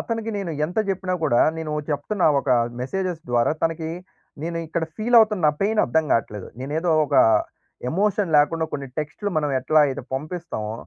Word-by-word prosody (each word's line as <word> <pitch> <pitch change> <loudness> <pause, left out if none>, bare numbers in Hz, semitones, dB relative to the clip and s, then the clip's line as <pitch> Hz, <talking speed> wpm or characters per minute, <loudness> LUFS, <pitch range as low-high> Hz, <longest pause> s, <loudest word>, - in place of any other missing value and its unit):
అతనికి 225 -1 -3
నేను 195 -4 -4 0.2
ఎంత 180 +6 -4
చెప్పినా 185 -1 -2
కూడా, 120 -6 +3 0.2
నేను 160 -2 -4 0.2
చెప్తున్న 150 +7 -1 0.2
ఒక 140 - -8 0.3
మెసేజెస్ 180 +5 -3
ద్వారా 120 +3 +2
తనకి 165 -1 -1 0.5
నేనిక్కడ 165 0 -3
ఫీల్ 235 +3 0
అవుతున్న 210 -7 +2
పెయిన్ 210 +2 +1
అర్థంకట్లేదు. 120 -8 0
నేనేదో 155 +6 -1 0.2
ఒక 145 - -3 0.8
ఎమోషన్ 195 -1 0
లేకుండా 160 +3 +3
కొన్నిటెక్స్ట్‌లు 145 +8 -4
మనం 150 -1 -1
ఎట్లా 155 +4 +3
అయితే 135 - -4
పంపిస్తామో! 150 -7 -4
160 Hz, 140 wpm, -23 LUFS, 145-190 Hz, 0.8 s, కూడా